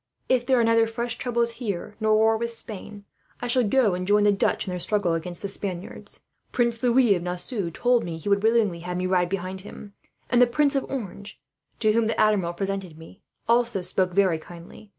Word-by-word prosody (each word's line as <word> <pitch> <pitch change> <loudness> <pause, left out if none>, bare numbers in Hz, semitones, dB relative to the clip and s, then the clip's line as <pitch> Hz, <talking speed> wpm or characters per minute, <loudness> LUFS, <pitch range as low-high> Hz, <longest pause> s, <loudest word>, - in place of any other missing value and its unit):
"If 245 -1 +1
there 260 -2 +4
are - - +3
neither 230 0 +4
fresh 235 +1 -3
troubles 235 -1 0
here, 205 -2 -4
nor 215 -1 +3
war 220 +1 +4
with 235 +1 -3
Spain, 210 -2 -8 0.3
I - - -5
shall 245 +1 +2
go 220 -2 +3
and 180 0 -3
join 205 +1 +4
the 205 - +5
Dutch 200 - 0
in 185 - -4
their 180 - -3
struggle 200 -2 0
against 170 +2 -5
the - - -1
Spaniards. 195 -2 -6 0.3
Prince 235 -2 0
Louis 245 -3 +4
of 180 - -2
Nassau 180 +2 -3
told 245 +7 +1
me 170 - -5
that 160 - -11
he - - -7
would 200 0 +3
willingly 220 -5 +2
have 180 +1 -5
me 180 - -2
to 185 - -1
ride 180 -2 +2
behind 190 0 -4
him; 205 +1 -11 0.3
and 245 0 +3
the 245 - +7
Prince 280 +4 +1
of 275 - 0
Orange, 205 -6 -6 0.4
to 215 -1 +4
whom 225 0 +2
the 225 - -2
Admiral 200 -5 +2
presented 195 -3 -4
me, 160 +4 -14 0.3
also 235 -4 +2
spoke 180 0 0
very 185 -4 +3
kindly. 175 +6 -13
205 Hz, 220 wpm, -25 LUFS, 180-235 Hz, 0.4 s, the